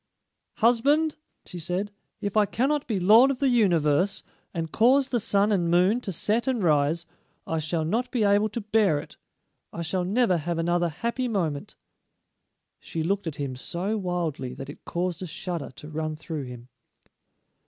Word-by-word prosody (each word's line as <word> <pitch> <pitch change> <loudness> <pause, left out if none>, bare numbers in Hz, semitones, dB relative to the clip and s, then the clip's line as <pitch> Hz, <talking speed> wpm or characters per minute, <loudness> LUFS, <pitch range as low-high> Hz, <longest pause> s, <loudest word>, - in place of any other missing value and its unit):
"Husband," 285 +7 +3 0.3
she 180 - -8
said, 180 +5 -2 0.3
"if 200 0 -3
I 210 -1 +4
cannot 285 +6 0
be 215 -5 0
lord 220 +8 +7
of 275 - -1
the 275 +1 +2
universe, 180 - +2 0.3
and 165 -3 -4
cause 260 +4 +4
the 240 - +1
sun 205 -1 +2
and 175 -4 +1
moon 185 +7 +3
to 200 - -4
set 215 - 0
and 250 -6 0
rise, 155 +1 +2 0.4
I 160 - -1
shall 155 +1 -1
not 235 +9 0
be 245 -4 0
able 205 +1 +3
to 230 +3 -4
bear 210 -6 +2
it. 145 - -8 0.5
I 170 - -5
shall 180 +2 -1
never 195 0 +2
have 170 +2 -3
another 175 +1 +1
happy 235 - -2
moment." 165 -10 -2 1.0
She 160 - -4
looked 195 +2 -1
at 155 - -3
him 140 -4 -4
so 180 +10 -2
wildly 175 - -3
that 135 +1 -7
it - - -16
caused 175 0 -2
a 185 - -4
shudder 170 -1 -4
to 150 - -10
run 155 0 -3
through 155 -2 -5
him. 125 0 -10
180 Hz, 175 wpm, -26 LUFS, 160-220 Hz, 1.0 s, lord